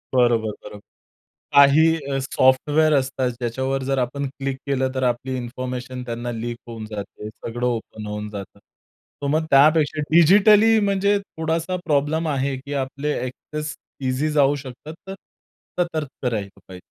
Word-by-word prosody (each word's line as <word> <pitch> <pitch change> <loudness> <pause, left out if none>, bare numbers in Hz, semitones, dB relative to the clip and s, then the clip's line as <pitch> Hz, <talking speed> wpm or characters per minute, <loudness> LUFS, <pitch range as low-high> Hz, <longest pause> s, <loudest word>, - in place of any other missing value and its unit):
बरोबर, 120 -3 +3
बरोबर. 105 - -10 0.8
काही 140 +2 +7 0.3
अ, 135 - 0
सॉफ्टवेअर 145 +4 +3
असतात 130 -2 +1
ज्याच्यावर 130 +3 -2
जर 135 +1 -1
आपण 135 +3 -2
क्लिक 135 0 -4
केलं 130 -1 +1
तर 130 - -1
आपली 125 +1 -1
इन्फॉर्मेशन 125 +1 -5
त्यांना 120 0 -4
लीक 120 +1 -4
होऊन 115 -2 -7
जाते. 105 0 -7
सगळं 120 +2 -5
ओपन 110 -2 -4
होऊन 105 0 -5
जातं. 100 -2 -9
तर 140 - -12
मग 155 +2 +1
त्यापेक्षा 150 +2 +4
डिजिटली 210 +6 +6
म्हणजे 200 +1 +2
थोडासा 165 -1 -3
प्रॉब्लेम 155 +2 +1
आहे 135 -2 0
की 140 +2 -8
आपले 140 +3 -3
ॲक्सेस 150 +4 -5 0.3
ईझी 140 +4 0
जाऊ 145 -1 +3
शकतात. 135 +4 -9
तर 190 - -5 0.7
सतर्क 155 -7 -3
राहिलं 100 -3 -4
पाहिजे. 95 -1 -10
135 Hz, 140 wpm, -22 LUFS, 120-155 Hz, 0.8 s, काही